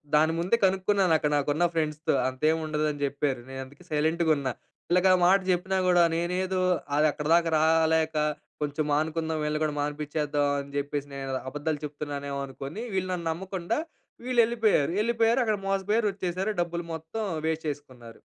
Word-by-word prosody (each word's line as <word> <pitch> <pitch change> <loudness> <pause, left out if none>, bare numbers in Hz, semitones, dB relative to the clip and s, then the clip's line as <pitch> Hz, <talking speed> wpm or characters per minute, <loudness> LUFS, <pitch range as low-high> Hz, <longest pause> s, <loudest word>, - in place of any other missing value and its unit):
దాని 160 +2 +4
ముందే 185 +7 +2
కనుక్కున్నాను. 190 -1 +2
అక్కడ 150 -1 -1
నాకు 145 0 -1
ఉన్న 170 +4 +2
ఫ్రెండ్స్‌తో. 155 -1 0
అంతేమి 155 +5 +1
ఉండదు 155 0 -1
అని 145 -1 -8
చెప్పారు. 140 -2 -1
నేను 135 0 -6
అందుకే 145 +7 -17
సైలెంట్‌గా 160 +2 +1
ఉన్నా. 135 -2 -2 0.4
వీళ్ళకి 180 +2 +4
ఆ - - +6
మాట 195 +2 +6
చెప్పినా 190 +2 -1
కూడా 175 -1 +5
నేనేదో 185 +2 -1 0.3
అది 150 +1 +4
అక్కడిదాకా 165 +3 +2
రాలేక, 160 0 +3 0.5
కొంచెం 145 +1 -1
మానుకుందాం, 160 +1 0
వీళ్ళని 150 0 -1
కూడా 150 - -2
మానిపించేద్దాం 145 0 -1
అని 140 0 -8
చెప్పేసి, 145 0 -2
నేను 135 -1 -4 0.2
అబద్ధాలు 150 +2 -3
చెప్తున్నానేమో 140 -1 -5
అనుకోని, 140 - -7
వీళ్ళు 185 -1 -1
నన్ను 170 -2 -3
నమ్మకుండా, 190 - -3 0.5
వీళ్ళు 250 -1 +1
వెళ్ళిపోయారు. 225 -10 +2
వెళ్ళిపోయారు, 230 +1 +2
అక్కడ 215 -2 +1
మోసపోయారు. 205 +3 +1
వచ్చేసారు 190 +2 -2
డబ్బులు 170 0 -3
మొత్తం 160 +8 -5 0.2
వేస్ట్ 160 0 -2
చేసుకున్నారు. 130 -5 -9
160 Hz, 155 wpm, -27 LUFS, 145-185 Hz, 0.5 s, ఆ